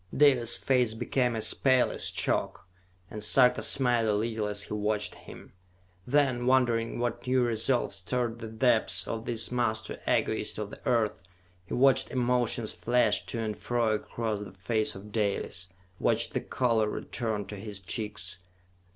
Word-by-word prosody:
Dalis' 130 -5 +5
face 125 -4 +1
became 120 +1 0
as 110 - +2
pale 130 -2 +3
as - - -2
chalk, - - -2 0.4
and 105 -1 -5
Sarka 125 +3 +5
smiled 120 -4 +3
a 105 - +2
little 110 0 -1
as 105 0 0
he - - -6
watched 105 -1 0
him. - - -13 0.5
Then, 130 -3 +2
wondering 120 -3 +2
what 120 0 -3
new 130 0 +3
resolve 120 +1 0
stirred 115 +4 -2
the 115 - -6
depths 110 +1 +1
of 115 0 -4
this 115 -1 -2
master 110 -3 -1
egotist - - 0
of - - -5
the - - -11
earth, 115 -4 +1 0.5
he - - -3
watched 135 +1 +4
emotions 120 -3 0
flash 125 +1 +2
to 115 - -3
and 110 -1 -3
fro 120 -1 0
across 110 0 -3
the 100 -3 -9
face 110 +3 -1
of 100 +2 -11
Dalis, 100 -4 -2 0.3
watched - - +1
the - - -1
color 115 -4 +1
return 110 -2 -3
to 105 - -8
his 100 0 -6
cheeks. 95 -2 -3
115 Hz, 160 wpm, -28 LUFS, 105-125 Hz, 0.5 s, Dalis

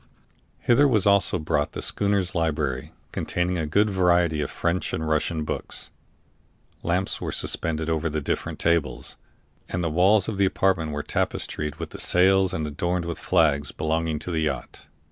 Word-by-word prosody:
Hither 140 +4 +4
was 110 -8 +2
also 100 -2 +4
brought 75 -2 -1
the - - -5
schooner's 100 -3 +1
library, 75 -6 -1 0.2
containing 90 0 -1
a 80 - -2
good 100 +8 +3
variety 90 -4 +2
of 75 - -2
French 85 +2 -1
and 80 - -2
Russian 80 +1 0
books; - - -5 0.9
lamps 90 +3 0
were - - -3
suspended 80 -1 -1
over 80 0 0
the 75 0 -2
different 70 - -3
tables; 80 -7 0 0.5
and 90 - -2
the 80 - -1
walls 95 +5 +4
of 105 -3 -4
the 100 - +5
apartment 95 -4 +1
were 75 0 -3
tapestried 75 -1 -2
with - - -7
the - - -8
sails 95 +1 +4
and 80 - -2
adorned 85 +4 -2
with 85 -1 -4
the - - -13
flags 75 -3 +2
belonging 80 0 -1
to 85 +4 -5
the 80 - 0
yacht. 70 -6 -4
85 Hz, 170 wpm, -25 LUFS, 75-95 Hz, 0.9 s, the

